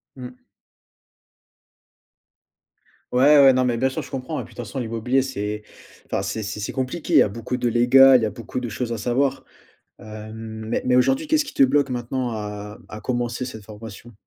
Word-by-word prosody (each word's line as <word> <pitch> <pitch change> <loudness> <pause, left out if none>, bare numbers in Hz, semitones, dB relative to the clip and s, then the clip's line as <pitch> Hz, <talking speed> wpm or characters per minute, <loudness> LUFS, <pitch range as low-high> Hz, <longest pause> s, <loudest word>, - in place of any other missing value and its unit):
Mmh. 125 -1 -9 2.8
Ouais, 140 +4 +6
ouais, 135 -1 +8
non, 130 - +2
mais 120 -2 0
bien 130 +3 +2
sûr, 130 - -3
je - - -12
comprends 135 +3 -4
et - - -7
puis - - -15
de - - -22
façon, 120 +3 -5
l'immobilier, 120 +3 0
c'est 105 -5 -4 0.4
enfin, - - -1
c'est 110 - -3
c'est 105 +1 -5
c'est 105 - -4
compliqué. 130 +5 -3
Il - - +7
y - - +7
a 105 - +3
beaucoup 115 +4 -4
de 125 -1 0
légal, 130 +3 +6
il 115 - -3
y - - +3
a 105 - -1
beaucoup 115 +4 -6
de 120 - -4
choses 120 +2 -4
à 115 - -2
savoir. 130 +5 0 0.5
Hem, 110 +1 -8
mais 115 - -1
mais 125 0 +3
aujourd'hui, 265 - +2
qu'est-ce 310 0 +2
qui - - -9
te 135 - +4
bloque 140 +1 +3
maintenant 125 0 -3
à 105 -1 -6
à 105 - -8
commencer 120 +1 -2
cette 110 -5 -8
formation? 110 +2 -11
120 Hz, 200 wpm, -23 LUFS, 110-130 Hz, 2.8 s, ouais